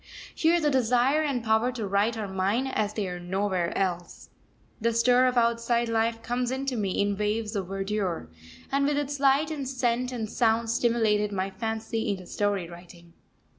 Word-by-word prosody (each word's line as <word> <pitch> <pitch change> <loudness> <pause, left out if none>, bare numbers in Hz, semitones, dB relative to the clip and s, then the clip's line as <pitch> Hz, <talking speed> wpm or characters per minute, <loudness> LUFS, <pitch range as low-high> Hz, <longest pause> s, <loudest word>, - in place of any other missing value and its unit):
Here 335 +2 +3
the 300 -2 +1
desire 255 +3 +3
and 275 -6 -1
power 220 +2 +2
to 230 -4 -4
write 200 +4 +1
are 215 -2 -3
mine 195 +6 0
as 215 -6 -1
they 210 -3 -1
are 180 -1 -5
nowhere 185 -1 -1
else. 175 -3 -3 0.5
The 230 +1 +1
stir 245 +2 +4
of 250 -1 0
outside 235 0 +2
life 225 0 0
comes 245 +1 -1
into 265 0 -2
me 200 -4 -1
in 205 0 +1
waves 210 +2 -2
of 195 -3 -2
verdure, 195 - -2 0.4
and 280 +1 +2
with 290 0 +1
its 290 -1 -2
light 280 +3 +3
and 280 -4 -4
scent 250 -1 0
and 230 -3 -3
sound 225 0 +1
stimulated 225 -3 +2
my 195 0 -2
fancy 225 +2 -3
into 190 -3 -3
story 200 -2 -1
writing. 170 0 -14
225 Hz, 175 wpm, -27 LUFS, 200-250 Hz, 0.5 s, stir